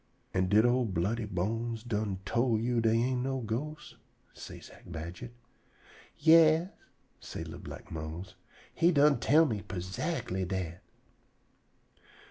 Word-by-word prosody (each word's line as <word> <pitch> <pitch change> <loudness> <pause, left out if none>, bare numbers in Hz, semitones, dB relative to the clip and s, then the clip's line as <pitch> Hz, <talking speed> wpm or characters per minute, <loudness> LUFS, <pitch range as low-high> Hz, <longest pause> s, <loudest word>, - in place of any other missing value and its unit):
"An' 95 0 +1
did 105 +3 +5
old 120 -5 +2
Bloody 105 +7 0
Bones 110 +4 -2
done 105 -5 -2
tol' 115 +1 +1
you 120 +1 +1
dey 115 0 +3
ain' 125 +2 +1
no 135 +1 -1
ghosts?" 145 +7 -5 0.4
say - - -9
Zack - - -15
Badget. 85 +7 -7 0.9
"Yas," 160 +2 +6 0.5
say - - -7
li'l - - -8
black - - -10
Mose, 80 +4 -6 0.4
"he 170 +2 +4
done 145 -4 +4
tell 155 +6 +5
me 110 -8 -2
perzactly 95 - -3
dat." 90 -2 -4
115 Hz, 125 wpm, -31 LUFS, 95-130 Hz, 0.9 s, Yas